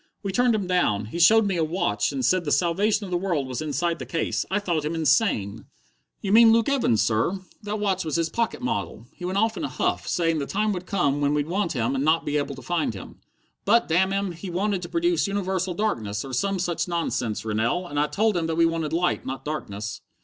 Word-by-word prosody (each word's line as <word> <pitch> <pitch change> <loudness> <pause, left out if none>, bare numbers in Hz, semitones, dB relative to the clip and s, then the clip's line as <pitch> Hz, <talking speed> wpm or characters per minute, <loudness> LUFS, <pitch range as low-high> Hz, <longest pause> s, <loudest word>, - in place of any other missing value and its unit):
We 200 - -2
turned 245 +3 +3
him 205 -3 -1
down! 175 - +1
He 115 +11 -6
showed 220 +6 +6
me 195 -3 0
a 165 - +2
watch 155 - 0
and 135 -3 -2
said 185 +7 +2
the 145 - -2
salvation 200 +6 +2
of 185 - -8
the 175 - +1
world 175 -7 -1
was 130 +2 -4
inside 155 +3 -1
the - - -5
case! 165 - -1
I 195 - +1
thought 175 -7 -1
him 155 +2 -2
insane!" 135 - +1 0.6
"You 195 - -2
mean 225 0 +8
Luke 230 0 +3
Evans, 250 - +2
sir. 115 - 0 0.2
That 210 0 -4
watch 195 -3 0
was 155 -3 -3
his 165 -1 +1
pocket 230 +7 -2
model. 230 - -3
He 180 - -8
went 185 +2 -2
off 220 +2 +1
in - - -4
a - - 0
huff, - - -1
saying 165 -2 +1
the 140 - -3
time 210 +1 0
would 180 -1 -6
come 145 -7 +1
when 145 +1 +2
we'd 145 -1 0
want 175 +1 -1
him 120 -1 0
and 135 0 -1
not 160 +2 +2
be 145 0 0
able 145 - -2
to - - -11
find 170 -10 -1
him." 95 - -10 0.5
"But, 235 +4 +3
damn 185 +4 +2
him, 195 -1 -1
he 175 +3 -8
wanted 190 +2 -1
to 175 - -7
produce 340 -5 +1
universal 190 -2 -1
darkness, 110 - -2
or 135 - -8
some 195 +9 0
such 175 -1 -1
nonsense, 145 -11 -2
Rennell, 115 +11 0
and 145 -4 -3
I 150 - +2
told 215 +5 +1
him 165 -2 0
that 165 - -1
we 165 - +5
wanted 165 -2 -1
light, 175 +1 +1
not 135 0 -6
darkness." 105 -9 -5
175 Hz, 240 wpm, -25 LUFS, 145-200 Hz, 0.6 s, mean